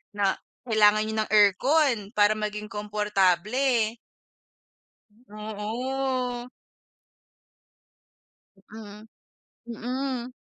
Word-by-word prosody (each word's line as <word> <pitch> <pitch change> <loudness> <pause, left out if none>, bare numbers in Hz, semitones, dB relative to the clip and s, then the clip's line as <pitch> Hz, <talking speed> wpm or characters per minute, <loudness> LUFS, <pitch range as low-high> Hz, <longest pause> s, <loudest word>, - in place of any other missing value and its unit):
na 200 -2 0 0.2
kailangan 215 -3 +4
niyo 220 0 -4
ng - - -11
aircon 245 - +4 0.2
para 210 +1 +4
maging 210 0 -4
komportable. 210 +3 +1 1.3
Oo. 245 +4 -3 2.3
Mm, 215 0 -11 0.6
mm. 250 +2 -4
215 Hz, 65 wpm, -26 LUFS, 210-250 Hz, 2.3 s, kailangan